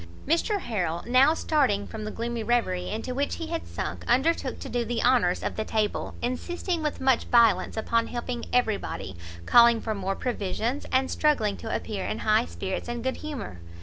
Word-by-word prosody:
Mr 365 Hz, -, +1 dB
Harrel 175 Hz, -7 st, -2 dB
now, 255 Hz, +6 st, +5 dB
starting 265 Hz, -12 st, +1 dB
from 215 Hz, -1 st, -7 dB
the -, -, -3 dB
gloomy 235 Hz, +1 st, -3 dB
reverie 215 Hz, -7 st, 0 dB
into 225 Hz, +4 st, -3 dB
which 280 Hz, +2 st, -1 dB
he 330 Hz, -, -5 dB
had 330 Hz, +1 st, -4 dB
sunk, -, -, -5 dB
undertook 270 Hz, +8 st, +2 dB
to -, -, -7 dB
do 240 Hz, -1 st, -1 dB
the 235 Hz, 0 st, -2 dB
honours 235 Hz, -8 st, +3 dB
of -, -, -2 dB
the 220 Hz, -, 0 dB
table, 215 Hz, -1 st, -1 dB
insisting 340 Hz, +7 st, -2 dB
with 300 Hz, -1 st, -2 dB
much 265 Hz, -2 st, +2 dB
violence 225 Hz, -5 st, +4 dB
upon 230 Hz, +1 st, +1 dB
helping 240 Hz, 0 st, -4 dB
every 235 Hz, -4 st, +2 dB
body, 95 Hz, -, -6 dB, 0.3 s
calling 235 Hz, -1 st, +7 dB
for 220 Hz, -1 st, -2 dB
more 195 Hz, -1 st, -2 dB
provisions, 235 Hz, +3 st, -2 dB
and 260 Hz, 0 st, +2 dB
struggling 225 Hz, -10 st, +2 dB
to 225 Hz, -, -7 dB
appear 200 Hz, -3 st, -3 dB
in -, -, -2 dB
high 215 Hz, +2 st, +2 dB
spirits 190 Hz, +4 st, -4 dB
and 240 Hz, -1 st, -4 dB
good 260 Hz, 0 st, -1 dB
humour. 275 Hz, -, -6 dB
235 Hz, 185 wpm, -27 LUFS, 215-265 Hz, 0.3 s, calling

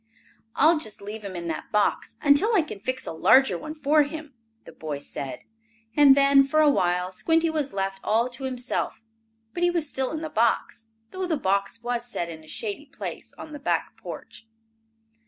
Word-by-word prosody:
"I'll 315 Hz, +2 st, +5 dB
just 215 Hz, -8 st, -5 dB
leave 210 Hz, +2 st, -7 dB
him 195 Hz, -2 st, -6 dB
in 170 Hz, -1 st, -5 dB
that 160 Hz, -, -5 dB
box 210 Hz, -1 st, +1 dB
until 325 Hz, +11 st, +5 dB
I 360 Hz, -, +4 dB
can 295 Hz, -10 st, -8 dB
fix 255 Hz, +5 st, -3 dB
a -, -, -4 dB
larger 220 Hz, +11 st, +5 dB
one 310 Hz, +1 st, -6 dB
for 300 Hz, 0 st, +3 dB
him," 300 Hz, 0 st, -4 dB, 0.3 s
the -, -, -11 dB
boy 155 Hz, -2 st, -5 dB
said, 140 Hz, -1 st, -6 dB, 0.5 s
and 280 Hz, -2 st, +7 dB
then, 275 Hz, 0 st, +6 dB
for 275 Hz, +3 st, +1 dB
a 300 Hz, -1 st, +6 dB
while, 180 Hz, -5 st, +1 dB
Squinty 325 Hz, -, +1 dB
was 300 Hz, -3 st, -2 dB
left 195 Hz, 0 st, -2 dB
all 230 Hz, +3 st, +2 dB
to 250 Hz, +2 st, -7 dB
himself. 250 Hz, -3 st, -3 dB, 0.5 s
But 350 Hz, -, -4 dB
he 350 Hz, -, +4 dB
was 340 Hz, -3 st, -1 dB
still 265 Hz, -2 st, -2 dB
in 315 Hz, 0 st, -4 dB
the 315 Hz, -, -4 dB
box, 225 Hz, 0 st, 0 dB, 0.2 s
though 375 Hz, -1 st, -3 dB
the 325 Hz, -3 st, 0 dB
box 200 Hz, 0 st, -1 dB
was 240 Hz, 0 st, -1 dB
set 205 Hz, -8 st, -4 dB
in 160 Hz, -1 st, -9 dB
a -, -, -17 dB
shady 220 Hz, -, -4 dB
place -, -, -7 dB
on 310 Hz, -, -9 dB
the 295 Hz, -, -7 dB
back 285 Hz, -, -1 dB
porch. 225 Hz, -, -10 dB
260 Hz, 195 wpm, -25 LUFS, 200-305 Hz, 0.5 s, and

